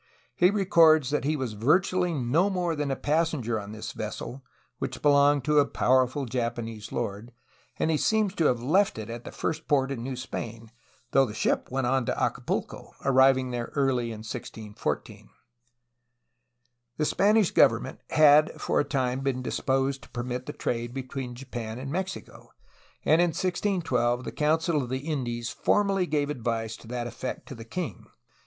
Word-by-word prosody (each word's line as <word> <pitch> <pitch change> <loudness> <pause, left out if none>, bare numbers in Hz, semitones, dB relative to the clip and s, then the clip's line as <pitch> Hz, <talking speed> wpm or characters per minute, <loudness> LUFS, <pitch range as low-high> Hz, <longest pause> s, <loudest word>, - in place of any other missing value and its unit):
He 175 +7 +5
records 165 -8 +4
that 150 - 0
he 155 +2 +1
was 130 -6 -3
virtually 180 - +2
no 155 +6 +1
more 180 -4 -1
than 145 -1 -2
a 135 - 0
passenger 145 -7 0
on 100 0 -8
this 110 +2 -6
vessel, 115 +4 -6 0.4
which - - -5
belonged 145 -1 +5
to 150 +1 +3
a 145 - +5
powerful 130 +1 +2
Japanese 115 -3 -4
lord, 115 0 -4 0.5
and 160 - +1
he 155 - +2
seems 215 +2 +1
to 165 -5 0
have 120 -4 +2
left 185 - +2
it 110 +1 -6
at 120 0 -7
the - - -7
first 160 0 -3
port 135 -2 +2
in 130 -4 -4
New 130 +2 -4
Spain, 115 -3 -6 0.4
though 135 -1 +4
the 105 - -7
ship - - 0
went 135 0 -1
on 130 -1 +1
to - - -1
Acapulco, - - -3
arriving 130 -1 +4
there 120 -1 -3
early 135 -4 +1
in 110 -2 -6
1614. 110 -1 -5 1.7
The 150 - +1
Spanish 205 +2 +3
government - - +3
had 155 0 +5
for - - 0
a - - +3
time 130 -2 -1
been 135 -2 -2
disposed 135 +2 0
to - - -15
permit 125 0 -4
of - - -25
the - - -4
trade 120 +1 -3
between 130 -1 -5
Japan 120 -3 -6
and 135 +2 -6
Mexico, 190 +3 -5 0.6
and 160 +3 +5
in 175 - +4
1612 165 - 0
the - - -5
Council 160 +1 +1
of 125 - -5
the 130 +4 -4
Indies 120 -6 -2
formally 195 -3 +1
gave 150 -1 0
advice 115 -4 -2
to - - -15
that 120 0 -3
effect 125 +2 -6
to - - -6
the 115 -3 -10
king. 140 - -5
135 Hz, 175 wpm, -27 LUFS, 120-155 Hz, 1.7 s, He